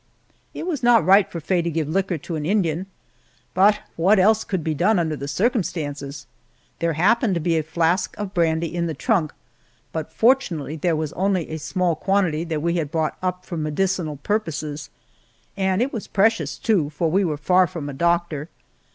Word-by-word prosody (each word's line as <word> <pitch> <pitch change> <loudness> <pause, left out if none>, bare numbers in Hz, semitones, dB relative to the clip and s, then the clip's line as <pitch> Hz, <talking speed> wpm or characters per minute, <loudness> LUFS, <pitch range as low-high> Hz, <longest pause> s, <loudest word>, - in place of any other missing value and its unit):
It - - -5
was 330 -7 -2
not 240 -8 +5
right 195 +2 +5
for 170 - -4
Faye 175 +3 0
to 170 - -2
give 160 -2 -2
liquor 185 +2 0
to 165 +3 -6
an 155 - -3
Indian, 180 -1 0 0.7
but 200 +3 +4 0.2
what 190 +6 +4
else 215 +3 +4
could 185 -5 -3
be 160 - -1
done 185 +8 +2
under 160 -3 0
the 140 -1 -6
circumstances? 145 - -2 0.5
There 170 -1 0
happened 205 - +2
to - - 0
be 165 +1 0
a 160 - +2
flask 165 +4 0
of 205 -2 -5
brandy 165 -2 +1
in 170 -1 0
the 160 - -4
trunk, 185 -11 +1 0.6
but 160 -1 -4
fortunately 220 - +1
there 165 +1 0
was 155 -1 -3
only 185 -3 0
a 160 - -3
small 175 +2 0
quantity 180 -3 +1
that 160 -3 -3
we 170 +1 +1
had 155 -4 -2
brought 160 0 -1
up 180 0 -3
for 170 - -5
medicinal 155 0 -1
purposes, 155 -5 -3 0.7
and 190 +2 +1
it 270 - -3
was 225 - -5
precious, 225 +3 +1
too, 185 -10 +1
for 160 +2 -1
we 195 +4 +3
were 155 -5 -1
far 180 +5 +3
from 165 -5 -6
a 145 - -5
doctor. 170 0 0
170 Hz, 190 wpm, -22 LUFS, 155-195 Hz, 0.7 s, not